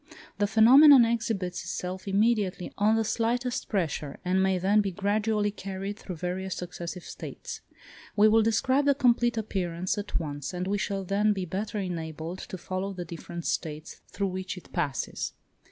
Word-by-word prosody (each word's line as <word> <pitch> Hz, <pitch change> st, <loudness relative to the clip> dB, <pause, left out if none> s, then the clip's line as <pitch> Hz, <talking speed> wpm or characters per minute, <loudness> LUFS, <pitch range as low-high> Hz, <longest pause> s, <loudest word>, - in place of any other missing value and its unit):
The 205 Hz, -, +3 dB
phenomenon 255 Hz, +5 st, +8 dB
exhibits 225 Hz, -6 st, -1 dB
itself 185 Hz, +2 st, -5 dB
immediately 200 Hz, -2 st, +1 dB
on 210 Hz, +2 st, +3 dB
the 225 Hz, -, +2 dB
slightest 245 Hz, +3 st, -1 dB
pressure, 160 Hz, -7 st, -2 dB
and 185 Hz, +1 st, +2 dB
may 190 Hz, -1 st, +2 dB
then 200 Hz, +4 st, +3 dB
be 200 Hz, -, -1 dB
gradually 205 Hz, +2 st, 0 dB
carried 195 Hz, +1 st, -5 dB
through 180 Hz, -, -7 dB
various 185 Hz, +3 st, -3 dB
successive 175 Hz, 0 st, -6 dB
states. 475 Hz, -2 st, -8 dB, 0.5 s
We 210 Hz, +1 st, +6 dB
will 220 Hz, +1 st, +5 dB
describe 260 Hz, +6 st, +2 dB
the 280 Hz, -1 st, +4 dB
complete 240 Hz, -3 st, +3 dB
appearance 185 Hz, -3 st, -2 dB
at 205 Hz, -2 st, -2 dB
once, 145 Hz, +1 st, -5 dB
as 180 Hz, +1 st, -2 dB
we 200 Hz, +2 st, 0 dB
shall 195 Hz, -1 st, -2 dB
then 205 Hz, +3 st, +2 dB
be 190 Hz, -2 st, -3 dB
better 205 Hz, +5 st, -3 dB
enabled 165 Hz, -2 st, -4 dB
to 185 Hz, -, -7 dB
follow 185 Hz, +2 st, -4 dB
the 180 Hz, -2 st, -6 dB
different 170 Hz, 0 st, -7 dB
states 155 Hz, 0 st, -3 dB
through 200 Hz, -1 st, -2 dB
which 185 Hz, 0 st, -5 dB
it 180 Hz, -, -13 dB
passes. 140 Hz, -2 st, -2 dB
195 Hz, 165 wpm, -28 LUFS, 180-220 Hz, 0.5 s, phenomenon